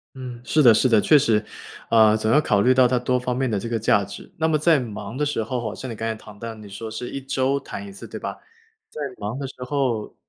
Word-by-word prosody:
嗯， 125 Hz, -2 st, -8 dB
是 155 Hz, +4 st, +2 dB
的 120 Hz, -3 st, +8 dB
是 110 Hz, +4 st, +3 dB
的， 110 Hz, -3 st, +5 dB
确 150 Hz, +8 st, +5 dB
实。 110 Hz, -6 st, +2 dB, 0.5 s
呃， 110 Hz, -1 st, +6 dB
总 110 Hz, 0 st, 0 dB
要 150 Hz, -, +5 dB
考 105 Hz, -8 st, +2 dB
虑 125 Hz, +4 st, +5 dB
到 130 Hz, -1 st, +5 dB
它 125 Hz, +1 st, +1 dB
多 125 Hz, +1 st, 0 dB
方 125 Hz, 0 st, -2 dB
面 130 Hz, -1 st, 0 dB
的 105 Hz, -3 st, 0 dB
这 115 Hz, -, -5 dB
个 115 Hz, -, 0 dB
价 105 Hz, -2 st, +3 dB
值。 100 Hz, +1 st, -10 dB
那 160 Hz, -, +1 dB
么 160 Hz, -1 st, +2 dB
在 155 Hz, 0 st, +4 dB
忙 110 Hz, -2 st, -6 dB
的 150 Hz, +2 st, 0 dB
时 145 Hz, -6 st, -1 dB
候 125 Hz, +3 st, -3 dB
好 110 Hz, -3 st, -4 dB
像 130 Hz, -, -7 dB
你 115 Hz, -, -5 dB
刚 115 Hz, +1 st, -3 dB
才 110 Hz, -, -2 dB
谈 105 Hz, -1 st, -14 dB
到， 115 Hz, 0 st, -6 dB
你 105 Hz, -1 st, -12 dB
说 105 Hz, +3 st, -7 dB
是 110 Hz, +3 st, -6 dB
1 140 Hz, -, -5 dB
周 135 Hz, +1 st, 0 dB
弹 140 Hz, -, -8 dB
1 200 Hz, -, -9 dB
次， 195 Hz, -, -10 dB
对 -, -, -7 dB
吧？ -, -, -5 dB, 0.5 s
在 150 Hz, -, -8 dB, 0.2 s
忙 105 Hz, +4 st, -4 dB
的 140 Hz, -, -4 dB
时 130 Hz, -, -11 dB
候 125 Hz, -6 st, -1 dB
120 Hz, 285 characters per minute, -23 LUFS, 110-135 Hz, 0.5 s, 的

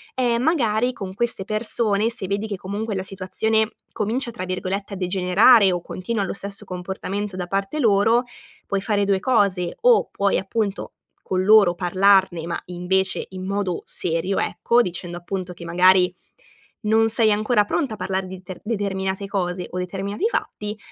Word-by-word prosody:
ehm, 240 Hz, -2 st, +1 dB
magari 245 Hz, -6 st, +2 dB
con 195 Hz, -5 st, -7 dB
queste 230 Hz, -1 st, -1 dB
persone, 215 Hz, 0 st, +1 dB
se 230 Hz, -4 st, -3 dB
vedi 200 Hz, +3 st, -2 dB
che 205 Hz, -, -3 dB
comunque 205 Hz, +3 st, -4 dB
la 190 Hz, -, -2 dB
situazione 215 Hz, +3 st, 0 dB, 0.2 s
comincia, 235 Hz, +4 st, -2 dB
tra 185 Hz, -5 st, -6 dB
virgolette, 190 Hz, +2 st, -3 dB
"a -, -, -5 dB
degenerare" 190 Hz, +3 st, +5 dB
o 175 Hz, -1 st, -2 dB
continua 200 Hz, +5 st, -3 dB
lo -, -, -3 dB
stesso 200 Hz, +1 st, -3 dB
comportamento 190 Hz, +2 st, -5 dB
da 180 Hz, -1 st, -3 dB
parte 195 Hz, +10 st, -2 dB
loro, 225 Hz, 0 st, +3 dB, 0.4 s
puoi 200 Hz, -, -1 dB
fare 205 Hz, -1 st, 0 dB
2 195 Hz, -1 st, +2 dB
cose: 195 Hz, -7 st, +1 dB
o 485 Hz, -1 st, +5 dB
puoi, 200 Hz, 0 st, +1 dB
appunto, 200 Hz, +1 st, -3 dB, 0.3 s
con 185 Hz, 0 st, -1 dB
loro, 205 Hz, -3 st, +6 dB
parlarne 185 Hz, -1 st, +3 dB
ma, 170 Hz, -, -4 dB
invece, 180 Hz, +2 st, -1 dB
in 185 Hz, 0 st, -7 dB
modo 195 Hz, -2 st, -2 dB
serio, 175 Hz, +3 st, -1 dB
ecco, 235 Hz, +1 st, +2 dB
dicendo 175 Hz, -3 st, -3 dB
appunto 180 Hz, +1 st, -5 dB
che 170 Hz, 0 st, -11 dB
magari 180 Hz, +1 st, +4 dB, 0.7 s
non 220 Hz, +1 st, +3 dB
sei 225 Hz, -1 st, +4 dB
ancora 215 Hz, +1 st, +2 dB
pronta 265 Hz, +2 st, -1 dB
a -, -, -7 dB
parlar 190 Hz, -1 st, -2 dB
di 185 Hz, 0 st, -9 dB
ter 185 Hz, 0 st, -9 dB
determinate 200 Hz, -3 st, -2 dB
cose 180 Hz, -2 st, -2 dB
o 180 Hz, -, -6 dB
determinati 195 Hz, -, -2 dB
fatti; 210 Hz, -, -4 dB
195 Hz, 165 wpm, -22 LUFS, 185-215 Hz, 0.7 s, loro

